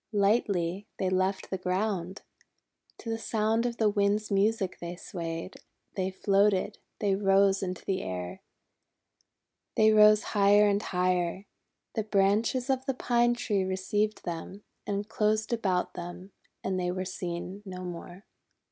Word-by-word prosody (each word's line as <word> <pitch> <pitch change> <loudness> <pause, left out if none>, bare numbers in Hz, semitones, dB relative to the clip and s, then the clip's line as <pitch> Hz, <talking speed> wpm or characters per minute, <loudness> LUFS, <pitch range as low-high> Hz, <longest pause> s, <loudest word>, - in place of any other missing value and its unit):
Lightly 200 -2 +1
they 185 -1 0
left 190 +1 0
the 190 - -2
ground. 185 0 -2 0.7
To 230 - -8
the 225 - -2
sound 225 +1 +1
of 235 -1 -4
the 220 - +3
Wind's 205 +1 +1
music 200 -1 +1
they 175 +1 -5
swayed, 170 0 -6 0.4
they 190 -1 -1
floated, 195 0 +1 0.2
they 200 -2 +1
rose 195 0 +3
into 185 -2 -4
the 190 -1 -1
air. 90 -1 -5 1.3
They 220 0 +5
rose 215 0 +7
higher 205 0 +5
and 200 0 +2
higher. 180 0 0 0.5
The 220 - 0
branches 215 +5 +1
of 265 -1 0
the 270 - 0
Pine 240 -1 +2
Tree 205 -5 0
re 190 0 -1
ceived 210 +3 -1
them, 175 +3 -6 0.2
and 205 0 -2
closed 215 +1 0
about 190 -6 0
them, 175 +2 -8 0.3
and 190 -1 -1
they 180 -1 -1
were 185 +1 -2
seen 180 +1 -5
no 185 -2 -7
more. 175 +1 -8
195 Hz, 145 wpm, -29 LUFS, 185-215 Hz, 1.3 s, rose